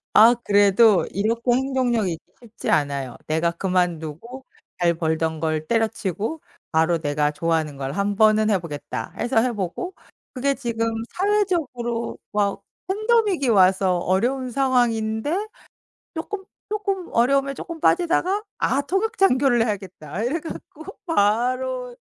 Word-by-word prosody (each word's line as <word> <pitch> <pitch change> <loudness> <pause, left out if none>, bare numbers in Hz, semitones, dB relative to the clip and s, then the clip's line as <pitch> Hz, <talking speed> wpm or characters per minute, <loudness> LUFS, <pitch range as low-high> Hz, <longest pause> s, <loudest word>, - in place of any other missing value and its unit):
아 230 +3 +8
그래도 205 0 +5
이렇게 230 +5 0
행동력이 245 -6 +1
있기 160 - -8 0.2
쉽지 230 -2 -6
않아요. 140 -3 0
내가 160 +2 +1
그만두고 180 - -2 0.3
잘 170 -1 +2
벌던 160 -1 -1
걸 155 -1 -1
때려 225 +2 +2
치우고 215 - -4 0.3
바로 160 +1 +3
'내가 150 -1 0
좋아하는 160 -1 -1
걸 135 0 -4
1 200 +4 -1
번은 215 0 +4
해 200 - +3
보겠다.' 145 -8 -6
해서 240 -1 +1
해 245 0 0
보고 210 - -4 0.4
그게 275 +1 0
지금 235 -4 -2 0.2
사회적으로 335 - -1 0.2
막 205 -1 0 0.3
팬데믹이 420 - +1
와서 190 -3 +4
어려운 245 +9 0
상황인데 245 - 0 0.7
쪼끔 385 +4 -5 0.3
쪼끔 395 -3 -2
어려움에 275 +3 +2
쪼끔 335 +4 -7
빠지다가 360 +5 +2
'아 270 +4 +1
통역 430 +8 -1
장교를 255 -9 +3
해야겠다.' 190 -3 -5
이래 275 +8 0
갖고 315 -1 -9 0.2
바로 250 0 0
230 Hz, 290 characters per minute, -23 LUFS, 180-275 Hz, 0.7 s, 아